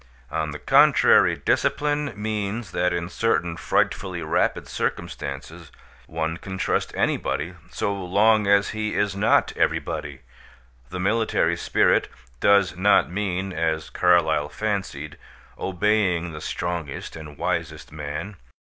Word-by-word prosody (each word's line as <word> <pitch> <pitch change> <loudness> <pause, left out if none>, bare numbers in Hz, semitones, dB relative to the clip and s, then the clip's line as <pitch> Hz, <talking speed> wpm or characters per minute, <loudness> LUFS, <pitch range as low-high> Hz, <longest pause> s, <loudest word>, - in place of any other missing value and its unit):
On 80 0 -1
the 75 - -6
contrary, - - +5
discipline 145 -1 0
means 105 +1 -3
that 90 +1 +1
in 85 0 -2
certain 90 -3 0
frightfully 90 -1 -1
rapid 80 - 0
circumstances, - - -5 0.4
one 80 0 -3
can 95 +1 -7
trust - - 0
anybody 90 - -1 0.2
so 100 - -2
long 100 +3 +2
as 100 0 +4
he 110 -1 -3
is 100 -1 0
not 100 - +2
everybody. 70 -2 -2 0.7
The 90 +1 -5
military 110 +4 +1
spirit - - +2 0.3
does 100 -1 +4
not 95 0 +3
mean 95 -1 -2
(as 80 -2 -1
Carlyle 80 -4 +3
fancied) 80 -7 -4 0.4
obeying 95 -3 0
the 75 -1 -8
strongest 85 -5 -4
and 75 -2 -10
wisest - - -3
man. 75 +7 -6
90 Hz, 120 wpm, -24 LUFS, 80-105 Hz, 0.7 s, contrary